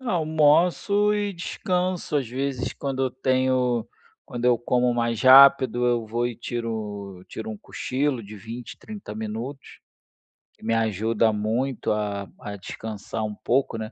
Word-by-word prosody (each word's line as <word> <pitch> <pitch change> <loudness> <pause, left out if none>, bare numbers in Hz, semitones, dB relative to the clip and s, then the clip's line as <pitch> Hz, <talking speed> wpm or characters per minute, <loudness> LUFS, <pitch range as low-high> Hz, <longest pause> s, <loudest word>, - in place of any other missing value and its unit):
Almoço 180 - +3
e 205 -1 -1
descanso, 180 -1 -2
às 130 -5 -1
vezes 130 0 -2
quando 135 -1 -3
eu 130 - -1
tenho 130 -2 +1 0.4
quando 120 0 -5
eu 120 -2 +4
como 125 +1 +1
mais 115 -2 0
rápido, 130 -2 +7
eu 120 -2 +1
vou 120 +2 -1
e 120 - -4
tiro 105 -5 -5
tiro 110 - -6
um 110 - -6
cochilo 130 +3 -2
de 105 +1 -10
20, 115 +5 -8
30 120 - -7 0.8
que - - -23
me 115 - +1
ajuda 110 +1 +1
muito 115 +5 -1
a 100 -2 -3
a 105 - -6
descansar 110 +2 -6
um 105 - -3
pouco, 125 +1 0
né, 110 0 -5
120 Hz, 140 wpm, -25 LUFS, 110-140 Hz, 0.8 s, rápido